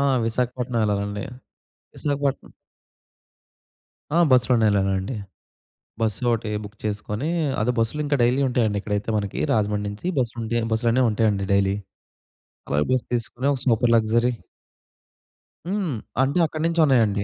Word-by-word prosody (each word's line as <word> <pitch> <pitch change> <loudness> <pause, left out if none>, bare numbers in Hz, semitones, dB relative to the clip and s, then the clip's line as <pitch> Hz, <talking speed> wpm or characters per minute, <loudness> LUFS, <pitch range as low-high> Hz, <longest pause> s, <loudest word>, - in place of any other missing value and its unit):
ఆ! - - +2 0.2
విశాఖపట్నం 125 0 -1
ఎళ్ళాలండి, 100 0 -1 0.7
విశాఖపట్నం 140 -2 -2 1.6
ఆ! - - +3
బస్‌లోనే 125 -2 +4
ఎళ్ళానండి. 95 +2 0 0.9
బసోటీ 115 0 0
బుక్ 105 +1 -10
చేసుకొనీ, 105 +6 -3 0.3
అదే 120 +4 +2
బస్‌లు 115 +7 0
ఇంక 145 - +1
డైలీ 125 +3 +3
ఉంటయండి 115 -5 +1
ఇక్కడైతే 105 +1 -2
మనకీ, 100 -2 -3
రాజమండ్రి 105 -1 0
నించి 105 +12 -6
బస్‌లు 120 -2 -1
ఉంటే 115 +1 -1 0.2
బస్‌లనేయి 120 +2 +2
ఉంటాయండి 105 -2 +1
డైలీ. 100 0 +2 0.9
అలా 70 - 0
బస్ 130 - +1
తీసుకొనీ 120 +3 -2
ఒక 130 - -4
సూపర్ 120 0 +3
లగ్జరీ. 115 +2 +2 1.4
హ్మ్. 195 -7 -1 0.3
అంటే 140 +6 +1
అక్కడ 155 0 -5
నుంచి 170 0 -1
ఉన్నాయండి. 110 -7 +3
115 Hz, 120 wpm, -23 LUFS, 105-125 Hz, 1.6 s, బస్‌లోనే